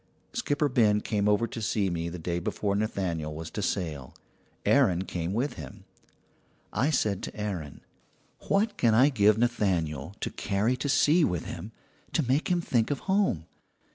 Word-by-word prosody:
"Skipper 150 - 0
Ben 110 -6 +3
came 105 -2 0
over 105 +3 +3
to 115 - -6
see 105 -3 0
me 85 0 -2
the 85 - -6
day 85 +1 -2
before 100 +3 -1
Nathaniel 85 -7 -2
was 80 0 -7
to - - -4
sail. 75 -7 -3 0.5
Aaron 90 0 +4
came 90 -2 -3
with 125 +8 -1
him. 65 -4 -11 0.9
"I 135 - +2
said 105 - +1
to - - -7
Aaron: 90 -9 -4 0.7
"'What 205 +2 +1
can 115 -3 +3
I 130 +5 +6
give 105 -5 +4
Nathaniel 95 - 0
to - - -2
carry 105 +5 0
to 140 +3 -2
sea 150 +4 +4
with 90 - 0
him - - -7 0.4
to 155 -7 +1
make 135 +5 +1
him 175 -1 +2
think 120 -8 +1
of 145 - -2
home? 190 - +1
105 Hz, 170 wpm, -28 LUFS, 85-130 Hz, 0.9 s, I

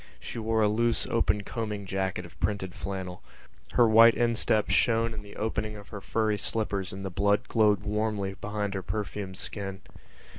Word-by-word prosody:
She - - -6
wore 110 0 +1
a - - +5
loose 115 +2 +1
open 110 -3 +1
combing 105 -2 -4
jacket 95 -2 -2
of 85 - -15
printed 95 -3 -1
flannel. 95 -1 -5 0.5
Her 120 - +6
white 115 +1 +8
instep 115 -2 +2
shone 115 -1 +3
in 110 - -6
the 100 -1 -13
opening 110 0 -2
of 100 -1 -11
her 100 -3 -7
furry 110 0 0
slippers 100 -4 -1
and 95 +1 -6
the 95 - -3
blood 100 +3 +2
glowed 105 -3 +3
warmly 105 -2 -1
behind 105 0 -3
her 95 - -2
perfumed 100 -1 -4
skin. 95 -2 -5
105 Hz, 175 wpm, -28 LUFS, 95-110 Hz, 0.5 s, white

